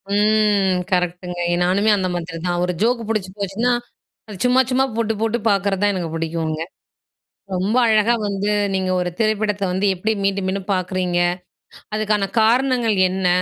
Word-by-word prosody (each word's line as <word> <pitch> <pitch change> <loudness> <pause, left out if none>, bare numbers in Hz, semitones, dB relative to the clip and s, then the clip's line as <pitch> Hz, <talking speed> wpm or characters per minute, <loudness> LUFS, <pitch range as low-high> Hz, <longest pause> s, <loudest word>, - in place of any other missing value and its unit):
ம். 205 -3 +3
கரெக்ட்‌டுங்க. 180 0 -1
ஏ - - +2
நானுமே 200 +4 +2
அந்த 185 -1 -1
மாதிரிதான். 175 +1 -3
ஒரு 180 - -2
ஜோக் 235 -2 0
புடிச்சு 200 -4 -2
போச்சுன்னா, 200 +5 0 0.7
சும்மா 255 +1 +5
சும்மா 265 +1 +3
போட்டு 225 -1 0
போட்டு 225 +1 +1
பார்க்குறது 195 -1 0
தான் 205 - +4
எனக்கு 175 -4 -3
பிடிக்குங்க. 160 -1 -2 0.9
ரொம்ப 190 +6 0
அழகா 220 +1 +4
வந்து 200 +1 -1 0.2
நீங்க 190 -1 -1
ஒரு 180 0 -1
திரைப்படத்த 215 -2 0
வந்து 190 +3 0
எப்படி 215 +5 -1
மீண்டும் 195 -1 0
மீண்டும் 190 0 -3
பார்க்குறீங்க? 185 -1 -1 0.7
அதுக்கான 210 -2 0
காரணங்கள் 240 -1 +2
என்ன? 185 0 -1
195 Hz, 145 wpm, -20 LUFS, 180-215 Hz, 0.9 s, சும்மா